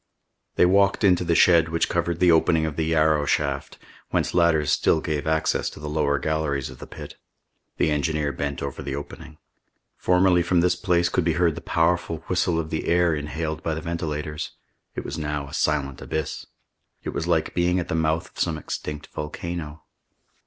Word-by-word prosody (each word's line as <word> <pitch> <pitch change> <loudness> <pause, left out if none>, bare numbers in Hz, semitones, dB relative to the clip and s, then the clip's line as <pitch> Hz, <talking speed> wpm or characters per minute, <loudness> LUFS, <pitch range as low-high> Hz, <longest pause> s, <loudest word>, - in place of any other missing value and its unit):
They - - +5
walked 100 +2 +3
into 90 -3 +4
the 85 -1 +1
shed 85 -2 +5
which 85 0 +1
covered 85 -1 -1
the 90 -1 +5
opening 80 0 +3
of 80 -2 -3
the 80 - 0
Yarrow 80 -2 +2
shaft, - - -1 0.3
whence - - 0
ladders 85 -4 +3
still 80 - +3
gave 80 -2 -3
access 80 0 +1
to - - -12
the 75 - -6
lower 75 -1 +1
galleries 75 -3 -1
of - - -13
the - - -9
pit. - - -10 0.6
The 80 - +2
engineer 75 -1 0
bent 70 -1 -4
over 70 -2 -5
the 70 0 -4
opening. 75 +2 -9 0.6
Formerly 90 -1 +3
from 85 0 +2
this 90 +1 +2
place 85 -1 +1
could 90 - 0
be 85 0 +1
heard 85 0 +2
the - - -8
powerful 85 -1 0
whistle 90 -2 +1
of 80 -1 -4
the 80 - -2
air 85 -1 +3
inhaled 80 +1 -3
by 80 - -2
the - - -3
ventilators. 75 -3 -4 0.4
It - - -5
was 75 +4 -5
now 75 -2 -3
a - - -12
silent 70 -3 0
abyss. 80 -2 -4 0.6
It - - -4
was - - -3
like - - +1
being 90 +1 +2
at 85 - -3
the - - -3
mouth 80 0 0
of - - -14
some 80 -2 0
extinct 75 -1 -5
volcano. 75 0 -6
80 Hz, 190 wpm, -24 LUFS, 75-85 Hz, 0.6 s, They